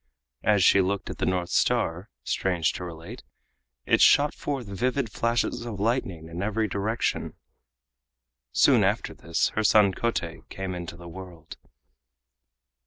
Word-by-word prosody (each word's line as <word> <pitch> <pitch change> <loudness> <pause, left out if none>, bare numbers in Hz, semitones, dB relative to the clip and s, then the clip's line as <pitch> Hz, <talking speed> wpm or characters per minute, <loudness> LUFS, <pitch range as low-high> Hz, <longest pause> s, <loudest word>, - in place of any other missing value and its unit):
As 105 -3 +3
she 100 - +6
looked 95 +1 -2
at - - -9
the - - 0
North 90 -1 -1
Star, 105 -6 +1
strange 90 -4 0
to - - -6
relate, 85 +7 -8 0.6
it - - +3
shot 145 +1 +5
forth 140 -4 -4
vivid 120 +5 -1
flashes 120 +1 -1
of 115 -4 -6
lightning 100 -7 -1
in 85 +2 -6
every 110 +2 0
direction. 105 +3 -2 1.2
Soon - - +4
after - - 0
this 85 0 -1
her 110 - -2
son 105 -2 +5
Kotei 90 -7 -2
came 95 -1 -5
into 85 -1 -7
the 85 0 -11
world. 85 -2 -10
100 Hz, 140 wpm, -26 LUFS, 85-115 Hz, 1.2 s, she